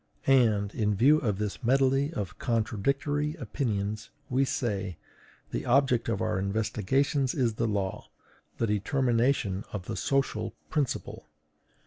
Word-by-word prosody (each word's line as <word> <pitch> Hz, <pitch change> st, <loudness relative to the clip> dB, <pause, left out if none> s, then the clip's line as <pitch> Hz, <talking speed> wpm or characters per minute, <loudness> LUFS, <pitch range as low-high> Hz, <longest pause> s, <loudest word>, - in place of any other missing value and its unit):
And, 110 Hz, -7 st, +3 dB
in 105 Hz, -2 st, +1 dB
view 145 Hz, +9 st, +5 dB
of 105 Hz, -8 st, -1 dB
this 105 Hz, +2 st, -4 dB
medley 135 Hz, +3 st, +3 dB
of 100 Hz, -, -5 dB
contradictory 140 Hz, +7 st, 0 dB
opinions, 110 Hz, -, -3 dB, 0.2 s
we 135 Hz, +2 st, +3 dB
say: 105 Hz, -, -2 dB, 0.5 s
"The -, -, -2 dB
object 125 Hz, -2 st, +3 dB
of 110 Hz, -3 st, -1 dB
our 95 Hz, -, 0 dB
investigations 115 Hz, -, 0 dB
is 125 Hz, -6 st, +1 dB
the 115 Hz, -, -1 dB
law, 100 Hz, -3 st, -2 dB, 0.5 s
the 115 Hz, -, +1 dB
determination 115 Hz, -1 st, +1 dB
of 95 Hz, -4 st, -5 dB
the -, -, -4 dB
social 135 Hz, -6 st, -1 dB, 0.2 s
principle. 145 Hz, -5 st, -2 dB
115 Hz, 125 wpm, -28 LUFS, 105-135 Hz, 0.5 s, view